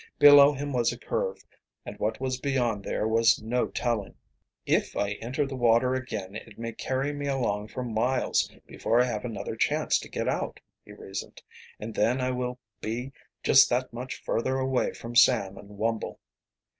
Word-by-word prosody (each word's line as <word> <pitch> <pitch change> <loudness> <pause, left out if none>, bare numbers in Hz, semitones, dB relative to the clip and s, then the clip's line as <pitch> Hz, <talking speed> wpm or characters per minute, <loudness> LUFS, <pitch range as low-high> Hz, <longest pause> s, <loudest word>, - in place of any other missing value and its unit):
Below 145 0 +9
him 145 0 -4
was 120 -2 +2
a - - -7
curve, 485 -1 -3 0.4
and - - -7
what - - -1
was 130 -1 -2
beyond 125 -7 0
there 105 - -1
was 115 +1 +4
no 120 +3 0
telling. 115 -5 -2 0.5
"If - - +1
I 100 0 0
enter 130 +6 -1
the 135 -1 -5
water 120 +1 +3
again 110 -7 -4
it - - -9
may 115 0 -4
carry 130 +5 -2
me 145 0 -4
along 115 -7 -1
for 125 +3 -5
miles 125 +2 0
before 115 - 0
I 125 - +5
have 115 -3 -3
another 115 -3 -4
chance - - +1
to - - -10
get - - -3
out," - - -2 0.2
he - - -14
reasoned. 95 0 -8 0.4
"And 110 +1 -6
then 120 +5 +2
I 130 0 0
will 125 0 -3 0.2
be 120 +5 -4 0.3
just 135 - +7
that 125 0 -1
much 125 +2 -6
further 130 +3 0
away 130 -1 0
from 120 +1 -8
Sam 115 -5 +5
and 100 0 -12
Wumble." 115 +1 -2
125 Hz, 180 wpm, -27 LUFS, 110-130 Hz, 0.5 s, Below